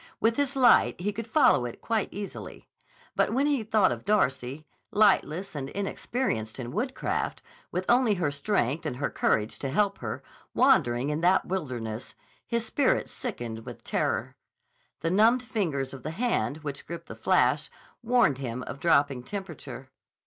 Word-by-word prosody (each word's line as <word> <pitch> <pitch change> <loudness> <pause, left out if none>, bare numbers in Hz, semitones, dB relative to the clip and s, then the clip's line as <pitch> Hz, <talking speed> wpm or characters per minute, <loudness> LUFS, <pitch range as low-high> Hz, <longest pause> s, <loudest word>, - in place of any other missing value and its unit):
With 225 +1 +2
his 285 -1 0
light 250 -8 +5
he 205 +4 -1
could 230 +2 -5
follow 220 - +4
it 120 - -6
quite 225 -3 -1
easily. 200 -1 -7 0.5
But - - +2
when 270 +4 +2
he 290 -4 +2
thought 215 -3 +3
of - - -4
Darcy, 140 -7 0 0.2
lightless 195 -3 +2
and 135 -3 -4
inexperienced 195 - -2
in 120 -2 -5
woodcraft, 255 - -2 0.3
with 185 +1 -2
only 240 -3 +4
her 170 -6 0
strength 140 - 0
and 135 - -3
her 140 +2 -2
courage 110 +1 0
to 135 - -3
help 200 +7 +1
her, 110 -3 -5 0.3
wandering 120 +4 +3
in 150 +2 -2
that 180 +2 +4
wilderness, 125 - -4 0.3
his 235 -1 -1
spirit 275 +4 +1
sickened 120 - -5
with - - -10
terror. - - -1 0.7
The 165 - 0
numbed 225 +6 +4
fingers 165 - -2
of 135 - -8
the 155 - -4
hand 160 - -1
which 145 -1 -6
gripped 170 0 -6
the - - -9
flash - - +2 0.3
warned 235 - +3
him 125 -1 -4
of 130 +3 -7
dropping 140 -5 +3
temperature. 195 +8 -7
175 Hz, 160 wpm, -28 LUFS, 135-220 Hz, 0.7 s, light